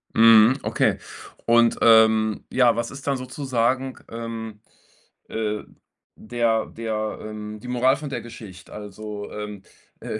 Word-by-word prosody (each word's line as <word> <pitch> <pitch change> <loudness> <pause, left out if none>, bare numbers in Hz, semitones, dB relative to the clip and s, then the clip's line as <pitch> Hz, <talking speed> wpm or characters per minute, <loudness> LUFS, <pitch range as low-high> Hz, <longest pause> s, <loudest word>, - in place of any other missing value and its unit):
Mhm, 115 +2 +7
okay. - - +1 0.5
Und, 115 0 +4
ähm, 110 -1 +5
ja, 125 -3 +4
was 120 - -2
ist 140 0 -10
dann 140 -1 0
sozusagen, 130 0 -1
ähm, 115 -2 -6 0.7
äh, 105 -1 -2 0.5
der 115 0 0
der 110 -1 -4
ähm, 105 0 -7
die 125 - -11
Moral 125 +2 +3
von 150 - -6
der 140 - -4
Geschicht? 110 -6 -11
Also, 105 0 -8
ähm, 105 -2 -7 0.4
äh, 110 - -4
115 Hz, 130 wpm, -23 LUFS, 110-120 Hz, 0.7 s, Mhm